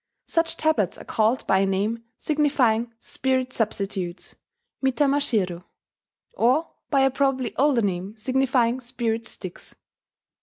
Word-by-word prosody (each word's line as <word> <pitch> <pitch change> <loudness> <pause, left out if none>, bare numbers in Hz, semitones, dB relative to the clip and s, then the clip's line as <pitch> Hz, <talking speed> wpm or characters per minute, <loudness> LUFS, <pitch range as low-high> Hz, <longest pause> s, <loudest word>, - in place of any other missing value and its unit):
Such 330 0 0
tablets 310 - +1
are - - -10
called 225 +3 +1
by 190 - +3
a 195 - +3
name 210 +4 -1
signifying 260 -7 +1
"spirit 260 +1 -1
substitutes" 195 -5 -3 0.5
(mitamashiro), 250 - +1 0.7
or 265 - +3 0.2
by 275 -2 +3
a 270 0 +4
probably 270 -2 0
older 265 -4 +3
name 195 +2 -2
signifying 255 0 +1
"spirit 230 -2 -2
sticks." 185 -3 -9
240 Hz, 115 wpm, -24 LUFS, 210-270 Hz, 0.7 s, a